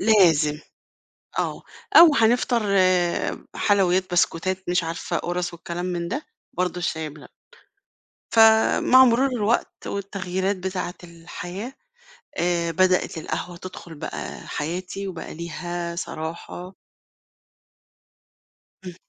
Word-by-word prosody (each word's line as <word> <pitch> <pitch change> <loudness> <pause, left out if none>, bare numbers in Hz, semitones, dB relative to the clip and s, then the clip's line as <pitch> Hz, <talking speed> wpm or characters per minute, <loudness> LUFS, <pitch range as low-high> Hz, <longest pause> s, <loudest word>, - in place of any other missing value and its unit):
لازم 165 -8 +4 0.8
آه، - - -2 0.3
أو 330 -4 +9
هنفطر 235 0 +3
آآ 185 -2 +1
حلويات 185 -2 +2
بسكوتات 185 +2 0
مش 180 -1 +2
عارفة 165 +1 -3
قرص 175 0 -2
والكلام 170 +1 -5
من 175 -1 -2
ده، 270 - -4 0.3
برضه 180 0 -1
الشاي 160 -3 -2
بلبن، 145 0 -13 1.1
فمع 225 +3 +6
مرور 250 +2 +3
الوقت 235 -3 -1
والتغييرات 195 -1 -2
بتاعة 185 -1 -4
الحياة، 175 +6 -8 0.6
آآ 170 -1 +1
بدأِت 185 0 +2
القهوة 175 +2 -4
تدخل 175 -2 -10
بقى - - -7
حياتي 180 +5 -4
وبقى 175 -4 -7
ليها 170 +1 -5
صراحة 170 +2 -6 2.1
إمم. 180 - -6
180 Hz, 100 wpm, -24 LUFS, 170-200 Hz, 2.1 s, أو